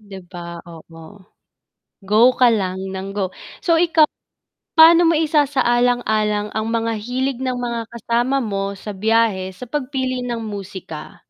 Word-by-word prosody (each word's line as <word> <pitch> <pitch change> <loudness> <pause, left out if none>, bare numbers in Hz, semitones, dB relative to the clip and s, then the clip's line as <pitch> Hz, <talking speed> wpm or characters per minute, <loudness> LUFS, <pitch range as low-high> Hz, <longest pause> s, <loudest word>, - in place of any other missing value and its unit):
'Di 200 -2 -11
ba, 170 -2 -8
oo, 165 0 -13 1.0
go 210 - 0 0.2
ka 250 -1 +6
lang 190 -4 -1 0.2
nang 195 +1 -6
go. 190 -2 -2 0.3
So 335 -3 +3
ikaw, 330 -2 +4 0.7
paano 335 +2 +8
mo - - +2
isasaalang-alang 245 -8 +1
ang 220 0 -2
mga 230 0 0
hilig 255 +2 -2
ng 255 -1 -2
mga 235 -1 -3
kasama 235 +3 0
mo 200 -5 -2
sa 210 0 -7
biyahe 215 -2 +1
sa 190 +7 -10
pagpili 260 -1 -3
ng 240 -1 -3
musika? 195 -7 -8
230 Hz, 140 wpm, -20 LUFS, 195-255 Hz, 1.0 s, paano